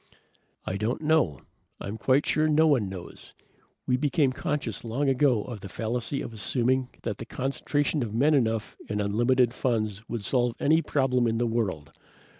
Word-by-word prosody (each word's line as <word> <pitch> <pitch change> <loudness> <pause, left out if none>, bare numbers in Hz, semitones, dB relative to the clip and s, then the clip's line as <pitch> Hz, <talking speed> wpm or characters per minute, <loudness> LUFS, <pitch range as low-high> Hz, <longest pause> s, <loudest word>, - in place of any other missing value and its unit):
"I 95 - -2
don't 110 +8 -2
know. 150 - +2 0.4
I'm 100 - -5
quite 135 +2 +3
sure 155 0 +2
no 155 +1 +4
one 130 -11 +3
knows. 95 -2 -10 0.5
We 125 - +2
became 145 0 +2
conscious 135 - -3
long 120 +5 -1
ago 130 -5 +3
of 120 -4 -7
the 100 - -9
fallacy 120 +6 -2
of 115 - -7
assuming 125 +4 0
that - - -3
the 115 - -6
concentration 145 +3 -1
of 115 -4 -3
men 140 +8 +3
enough 115 -5 0
and 105 - -1
unlimited 120 +4 +2
funds 110 -6 -1
would 115 -3 -4
solve 120 0 +1
any 160 +3 +3
problem 130 -5 +1
in 115 0 0
the 120 - +1
world. 100 -11 -2
125 Hz, 170 wpm, -27 LUFS, 110-140 Hz, 0.5 s, no